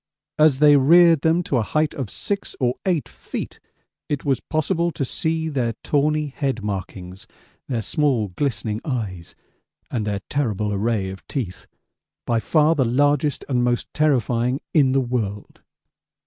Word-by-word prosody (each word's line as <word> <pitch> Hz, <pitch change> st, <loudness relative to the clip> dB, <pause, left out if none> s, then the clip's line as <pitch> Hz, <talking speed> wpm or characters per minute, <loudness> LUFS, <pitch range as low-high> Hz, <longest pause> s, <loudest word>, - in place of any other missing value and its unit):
As 155 Hz, -3 st, +5 dB
they 145 Hz, 0 st, +6 dB
reared 165 Hz, +2 st, +6 dB
them 165 Hz, +2 st, +2 dB
to 140 Hz, -, 0 dB
a -, -, +2 dB
height 155 Hz, +7 st, 0 dB
of 130 Hz, -7 st, -4 dB
6 200 Hz, -, -4 dB
or 125 Hz, -2 st, +2 dB
8 175 Hz, -6 st, +1 dB
feet -, -, -7 dB, 0.5 s
it 145 Hz, -2 st, -2 dB
was 135 Hz, -2 st, +1 dB
possible 170 Hz, +2 st, 0 dB
to 145 Hz, -4 st, -3 dB
see 160 Hz, +4 st, -1 dB
their 130 Hz, -7 st, -1 dB
tawny 150 Hz, +1 st, +1 dB
head 135 Hz, -5 st, -3 dB
markings, 95 Hz, 0 st, -6 dB, 0.4 s
their 120 Hz, -5 st, -2 dB
small 130 Hz, -6 st, +1 dB
glistening 110 Hz, 0 st, -2 dB
eyes, 105 Hz, -, -4 dB, 0.6 s
and 110 Hz, -4 st, -2 dB
their 100 Hz, -1 st, -2 dB
terrible 105 Hz, -7 st, -1 dB
array 100 Hz, -2 st, -1 dB
of 95 Hz, -, -12 dB
teeth 115 Hz, -10 st, -5 dB, 0.6 s
by 115 Hz, -1 st, +1 dB
far 155 Hz, +6 st, +3 dB
the 145 Hz, -5 st, +2 dB
largest 145 Hz, +4 st, +1 dB
and 125 Hz, -3 st, +1 dB
most 120 Hz, 0 st, -1 dB
terrifying 125 Hz, -3 st, +1 dB
in 140 Hz, -5 st, +4 dB
the 135 Hz, -, +3 dB
world. 110 Hz, -5 st, -4 dB
130 Hz, 150 wpm, -22 LUFS, 110-150 Hz, 0.6 s, they